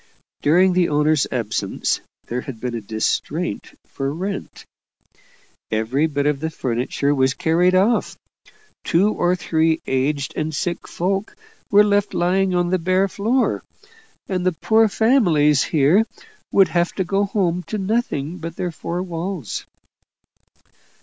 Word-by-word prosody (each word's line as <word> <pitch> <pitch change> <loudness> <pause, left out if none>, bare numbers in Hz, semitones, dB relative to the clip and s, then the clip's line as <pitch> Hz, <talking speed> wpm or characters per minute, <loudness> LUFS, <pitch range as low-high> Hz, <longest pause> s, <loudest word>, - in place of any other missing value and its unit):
During 180 +5 +4
the 175 -1 +2
owners' 150 0 +2
absence - - -1 0.2
there 125 +2 -3
had 125 -4 -8
been 125 +1 -4
a 115 - -3
distraint 110 +1 -3
for 135 0 -4
rent; 190 +6 -5 1.0
every 115 +8 +1
bit 145 -2 -2
of 145 -2 +1
the 160 +2 -2
furniture 130 +1 -1
was 130 -1 +2
carried 175 +3 +2
off; 205 +6 +2 0.7
two 200 +6 +2
or 175 +1 +1
three 160 -2 +1
aged 135 +1 -1
and 155 0 -2
sick 175 +2 -3
folk 195 +4 -2 0.3
were 205 0 +6
left 205 0 +1
lying 185 +2 +1
on 175 0 +1
the 185 - +2
bare 185 +3 +2
floor 225 +7 0 0.7
and 185 -2 -2
the 185 0 +1
poor 220 +6 +3
families 175 - +3
here 165 +9 +3 0.4
would 195 -2 +5
have 175 0 0
to 190 - -1
go 195 +3 0
home 180 -3 0
to 215 - -3
nothing 185 -6 -2
but 165 +1 -6
their 175 0 -3
four 175 +2 -4
walls. 175 - -5
175 Hz, 140 wpm, -21 LUFS, 145-195 Hz, 1.0 s, were